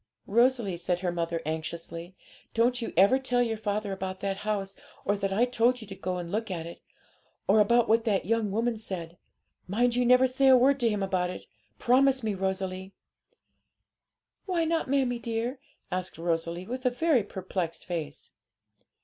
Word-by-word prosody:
'Rosalie,' 235 -4 +2
said 175 +1 -1
her 180 -2 0
mother 170 -1 -2
anxiously, 165 +3 -5 0.4
'don't 245 +2 +2
you 230 - -3
ever 200 +8 +6
tell 250 -2 +1
your 225 -2 -1
father 210 -1 -2
about 190 -1 -4
that 195 -1 -2
house, 200 -2 -3 0.3
or 205 - +2
that 195 -1 -2
I 220 +5 +3
told 245 0 +2
you 220 - -9
to 195 - -8
go 185 -1 -3
and 175 -1 -5
look 220 +2 -2
at 170 -3 -4
it, 170 - -10 0.7
or 210 +3 +5
about 235 +3 +4
what 225 +1 +3
that 205 -5 +1
young 225 0 +1
woman 225 +2 -1
said. 175 -5 -6 0.5
Mind 240 +5 +1
you 250 - +2
never 250 +1 +6
say 260 +1 +2
a 260 -1 +8
word 275 +3 +4
to 235 -2 +3
him 205 -2 -1
about 185 -2 0
it; 180 - -7 0.3
promise 265 +1 +3
me, 215 -2 0
Rosalie.' 190 0 -3 1.5
'Why 345 -3 +1
not, 325 -2 0
mammie 260 -3 +1
dear?' 235 +3 -3 0.3
asked 185 -2 -3
Rosalie, 170 +1 -2
with 255 +4 -5
a 250 - +4
very 275 +1 +2
perplexed 185 -4 -4
face. 160 -5 -5
210 Hz, 175 wpm, -28 LUFS, 185-245 Hz, 1.5 s, a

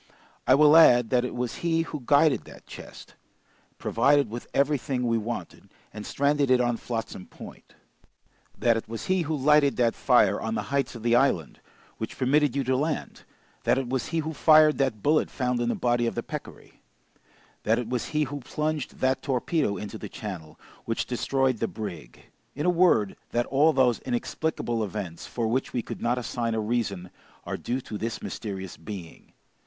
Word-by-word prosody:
I 130 - +7
will 150 +1 +6
add 120 -8 +7
that 125 -1 +3
it 125 - -4
was 125 -1 -3
he 165 -1 +1
who 150 -3 -7
guided 145 +2 +3
that - - -14
chest, - - -11 0.6
provided 140 +2 +2
with 120 +1 -6
everything 140 -3 0
we 115 -1 +1
wanted, 115 +2 -6 0.2
and 105 -1 -7
stranded 140 0 +1
it 130 -1 +5
on 120 -1 +1
Flotsam 115 -6 -5
Point; - - -13 0.8
that 120 -1 +3
it 115 - -4
was 115 -1 -5
he 185 -1 +1
who 160 -1 -2
lighted 150 0 +4
that 120 -2 +2
fire 105 -6 +3
on 110 0 -2
the - - -2
heights 140 -2 0
of 115 - -9
the 120 0 +3
island, 120 - +1 0.4
which 110 - -5
permitted 140 +1 +2
you 140 - 0
to 130 +1 +1
land; 150 +3 -3 0.4
that - - +2
it 135 -2 -2
was 130 -1 -1
he 165 - -3
who 160 0 -2
fired 155 0 +5
that 130 -7 0
bullet 155 +1 +2
found 125 -2 -1
in 120 0 0
the - - 0
body 120 -1 +1
of 115 - -3
the - - -3
peccary; - - -9 0.8
that 110 +2 +2
it 120 -2 -3
was 125 0 -2
he 150 0 0
who 145 +1 -5
plunged 150 +2 -3
that 130 0 +1
torpedo 135 - 0
into 105 +3 -7
the 105 - -7
channel, 90 -8 -8 0.3
which - - -1
destroyed 135 -3 0
the 115 - 0
brig; 85 - -8 0.3
in 150 - -3
a 180 - +4
word, 170 - +3
that 120 0 0
all 145 +4 +3
those 130 -5 +2
inexplicable 120 -1 -2
events, 95 -5 -6
for 115 -2 -2
which 130 +4 -1
we 120 - -1
could - - -7
not 120 +1 +1
assign 115 -1 -2
a - - 0
reason, 105 -5 -2 0.3
are - - -3
due 125 +2 -3
to 110 -5 -7
this 115 +1 -3
mysterious 95 -4 -6
being. 95 -6 -10
125 Hz, 190 wpm, -26 LUFS, 115-145 Hz, 0.8 s, I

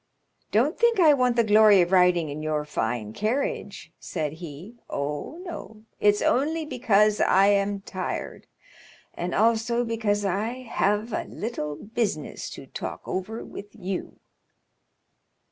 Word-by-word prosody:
"Don't 255 - +2
think 470 -2 +3
I 315 -4 +7
want 250 -3 +2
the 235 - +4
glory 215 -2 +6
of 175 +1 0
riding 180 -4 +4
in 145 +2 -5
your 155 -1 -1
fine 110 -6 -2
carriage," 275 - -3
said 155 -4 -3
he; 170 +6 -9 0.2
"oh, 145 - -4
no, 220 - -8 0.2
it's 205 0 +3
only 310 +5 +1
because 215 -6 +2
I 195 +1 +5
am 200 0 +1
tired, 190 -1 -5 0.7
and 175 +1 -3
also 230 +2 +2
because 215 -3 0
I 200 +5 -1
have 215 -1 0
a - - -2
little 150 -10 -4
business 205 -6 -3
to - - -9
talk - - -6
over 200 +5 -4
with 205 +1 -10
you." 190 -3 -5
205 Hz, 135 wpm, -26 LUFS, 180-235 Hz, 0.7 s, I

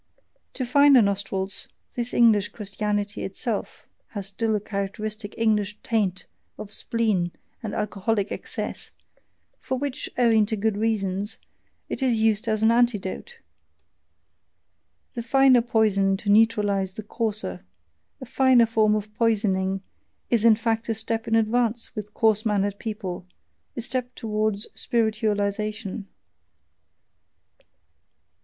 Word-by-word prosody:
To 255 - -2
finer 280 +1 +6
nostrils, 200 -1 -2 0.3
this 240 0 -3
English 220 -4 +4
Christianity 205 -1 -3
itself 205 +3 -4 0.3
has 200 -2 -3
still 215 +3 -1
a - - +1
characteristic 205 +1 -4
English 210 -2 +1
taint 200 -5 0 0.3
of 205 0 -8
spleen 210 -7 0 0.3
and 215 -3 -4
alcoholic 205 0 -1
excess, - - -5 0.7
for 260 - -3
which, 280 0 -3
owing 225 -4 +4
to 220 - -1
good 215 0 0
reasons, 205 -1 -1 0.5
it - - -5
is 255 -3 +3
used 220 0 +2
as 215 0 0
an 225 - +6
antidote 235 - 0 1.8
the 240 - -4
finer 260 +1 +5
poison 205 -4 +2
to 205 +1 -1
neutralize 205 -3 +3
the 215 - -6
coarser: 210 - -3 0.6
a 260 - -7
finer 255 -1 +4
form 220 -1 +3
of 210 0 -4
poisoning 195 -4 +1 0.5
is 230 -3 +3
in 230 -2 +7
fact 225 +1 -1
a 225 - +1
step 225 +1 -3
in 225 - +2
advance 230 +1 +1
with 210 -1 -7
coarse 220 -1 +3
mannered 205 -2 0
people, 195 -5 -5 0.5
a - - -1
step 250 +1 -3
towards 215 -2 -1
spiritualization. 215 -2 -1
215 Hz, 120 wpm, -25 LUFS, 200-230 Hz, 1.8 s, in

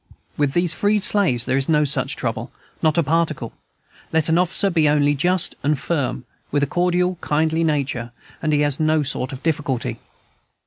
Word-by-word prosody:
With 145 -2 0
these 175 -1 +3
freed 205 +4 +1
slaves 180 - +2
there 130 - +1
is 135 +2 -1
no 150 -1 +3
such 140 - -1
trouble, - - -4 0.3
not 155 0 +2
a 170 - +4
particle: 155 -5 -1 0.6
let 160 0 +1
an 165 +2 +3
officer 190 +3 +1
be 160 -3 +3
only 145 -1 +3
just 175 +5 +2
and 150 +1 +1
firm, 135 -4 -2 0.2
with 145 0 0
a - - +4
cordial, 180 +3 0
kindly 160 +2 0
nature, 135 -6 -1 0.3
and 155 - 0
he 150 -1 +2
has 145 -1 +1
no 155 -1 +2
sort 130 0 -2
of 135 0 -9
difficulty. 145 -6 -2
155 Hz, 180 wpm, -21 LUFS, 145-170 Hz, 0.6 s, a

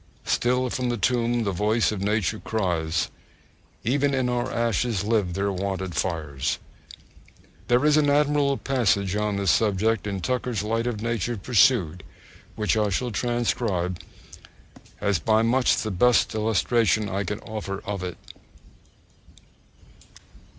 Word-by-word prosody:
Still 125 +1 +1
from 125 -1 -1
the 120 - -1
tomb 120 +2 +1
the 100 - -1
voice 105 +5 +1
of 105 -3 -4
nature 105 +1 0
cries; 85 -6 -1 0.7
Even 140 +4 +1
in 130 -2 0
our 125 +1 -1
ashes 115 -3 0
live 105 -5 0
their 100 +1 0
wonted 95 -1 -3
fires! 75 -5 -2 1.1
There 120 +4 +3
is 150 0 +5
an 145 -1 +3
admirable 145 -1 +2
passage 105 -7 +1
on 105 -1 0
this 100 -3 +2
subject 110 +3 +1
in 100 -1 -3
Tucker's 120 +3 -2
Light 115 +2 -1
of 110 -3 -3
Nature 115 0 -1
Pursued, 100 - +2 0.5
which 105 0 0
I 105 -1 +1
shall 120 +6 -1
transcribe, 110 -6 -1 1.0
as 100 -4 +1
by 110 0 +2
much 125 +2 +3
the 110 - -2
best 120 +7 +3
illustration 110 0 +1
I 100 +1 -2
can 105 +3 -4
offer 105 -3 -6
of 100 -2 -4
it. 90 -1 -5
110 Hz, 135 wpm, -25 LUFS, 95-120 Hz, 1.1 s, is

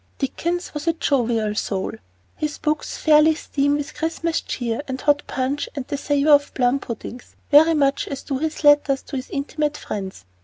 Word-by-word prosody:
Dickens 340 +6 -2
was 295 +2 -5
a 330 - +4
jovial 235 -8 0
soul. 195 -2 -2 0.4
His 300 -1 -3
books 305 0 -2
fairly 310 0 +5
steam 285 -2 0
with 290 -1 -4
Christmas 325 +1 -2
cheer 235 0 -3
and 260 -1 -4
hot 290 +1 +2
punch 270 +2 -2
and 275 -3 -4
the - - -1
savor 290 +1 +1
of 285 0 +4
plum 250 +1 +2
puddings, 240 0 -8 0.2
very 320 +3 +7
much 280 -2 +1
as 275 -1 -6
do 270 -2 -3
his 315 +1 -3
letters 290 -2 +4
to - - -8
his 260 0 -5
intimate 295 0 -2
friends. 190 - -6
285 Hz, 180 wpm, -22 LUFS, 260-305 Hz, 0.4 s, very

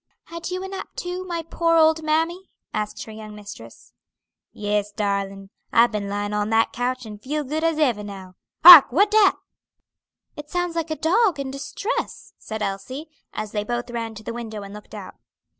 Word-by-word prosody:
"Had 335 0 -6
you 365 +1 -4
a - - -5
nap 385 0 -6
too, 360 +1 -4
my 340 -2 -4
poor 330 +1 0
old 320 0 +4
mammy?" 325 +4 -1 0.2
asked 210 0 -3
her 220 - -11
young 215 -1 -10
mistress. 205 - -12 0.6
"Yes, 210 0 -2
darlin'. 200 -1 -3 0.2
I've 235 +1 +5
been 205 -2 -3
lying 205 +1 -3
on 210 0 -1
that 225 0 +2
coach, 255 -1 -2
and 210 -1 -10
feel 300 +5 -3
good 305 +4 -3
as 330 -1 +1
ever 245 -9 +1
now. 190 -2 -9 0.3
Hark! 335 -6 +12
what 400 - +3
dat?" 425 -2 +5 1.0
"It 295 0 -9
sounds 355 -1 -2
like 330 -1 -2
a 315 - -2
dog 355 +1 +2
in 270 -1 -4
distress," 335 - -5
said 220 -1 -5
Elsie, 255 +11 -5 0.2
as 215 -1 -5
they 210 -1 -2
both 240 +2 -4
ran 230 -2 -4
to 215 - -10
the 230 - -5
window 220 -3 -6
and 200 0 -10
looked 210 0 -11
out. - - -9
240 Hz, 190 wpm, -23 LUFS, 210-330 Hz, 1.0 s, Hark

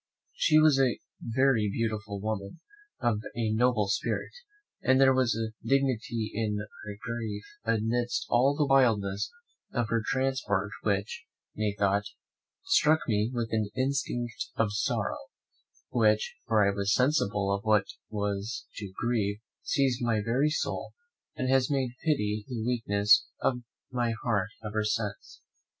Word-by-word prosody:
She 155 - +3
was 155 -3 +6
a 130 -3 +3 0.2
very 120 -3 +2
beautiful 110 -2 -2
woman, 105 +5 -4 0.4
of 115 -3 +1 0.2
a 115 -2 0
noble 115 -2 +2
spirit, 100 - -1 0.5
and 130 0 +4
there 135 -1 +6
was 130 -4 +2
a 110 0 -3
dignity 120 -5 0
in 105 -1 -1
her 105 0 -8
grief 110 -3 -4 0.2
amidst 115 +2 0
all 130 +4 +3
the 150 - +3
wildness 110 -8 +2 0.4
of 120 -3 -1
her 115 -1 +1
transport 130 -7 0
which, 100 -1 -1 0.3
methought, 100 -1 +1 0.6
struck 160 - +4
me 105 -1 +1
with 120 -3 -2
an 110 -2 0
instinct 120 -5 -1
of 105 -2 +1
sorrow, 105 - -1 0.7
which, 110 -3 +2
before 110 -3 +4
I 100 - +2
was 100 +2 +1
sensible 105 -8 +2
of 100 +1 -2
what 110 -1 +4
it - - -11 0.2
was 105 +2 -3
to 100 -3 -6
grieve, 110 -4 0 0.2
seized 135 -3 +1
my 115 -3 +1
very 130 +6 +2
soul, 155 - -3 0.4
and 130 - -2
has 130 -1 +3
made 135 -4 0
pity 105 -9 0
the 115 -4 -4
weakness 110 -2 +3
of 125 -2 0 0.3
my 120 -2 0
heart 100 -5 +1 0.2
ever 110 0 -1
since. 105 -1 -3
115 Hz, 140 wpm, -29 LUFS, 105-125 Hz, 0.7 s, was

